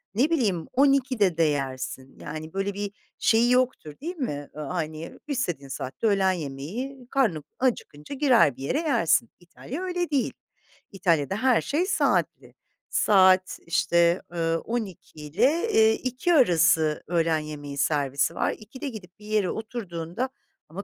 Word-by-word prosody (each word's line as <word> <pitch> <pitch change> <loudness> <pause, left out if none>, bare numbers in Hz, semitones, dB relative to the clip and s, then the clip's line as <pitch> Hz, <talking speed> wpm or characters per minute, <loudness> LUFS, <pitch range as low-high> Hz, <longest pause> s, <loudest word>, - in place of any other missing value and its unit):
ne 260 +8 +3
bileyim 205 - 0
12'de 255 - +3
de 165 - +4
yersin. 135 -3 -3
Yani, 155 +1 -7
böyle 195 +1 -1
bir 205 0 -4 0.3
şeyi 230 +2 +3
yoktur 250 -11 +1
değil 345 +5 -4
mi? 145 - -4
Iıı, 155 - -6
hani, 160 -1 -5
istediğin 175 - -2
saatte 130 - -3
de - - +4
öğlen 190 -1 +3
yemeği, 185 - -5
karnın 215 - +1 0.2
acıkınca 240 - -2
girer 255 - +4
bir 135 - -8
yere 260 - 0
yersin. 235 - +2
İtalya 185 - -8
öyle 355 -2 -2
değil. 280 -4 0 0.6
İtalya'da 180 -3 +1
her 255 -2 +4
şey 325 +6 0
saatli. - - 0 0.3
Saat, 185 -2 +4
işte, 170 +1 +2
ııı, 165 -1 0
12 215 -9 -5
ile, 250 - +1
eee, 220 0 +5
2 255 +7 -1
arası 165 - +4
öğlen 165 -2 +1
yemeği 145 -2 -7
servisi 140 -2 +1
var. - - +1
2'de 260 +7 -7
gidip 195 -6 -11
bir 210 - -14
yere 210 -3 +1
oturduğunda 220 -1 -4 0.4
ama 185 +6 -7
190 Hz, 145 wpm, -26 LUFS, 160-255 Hz, 0.6 s, eee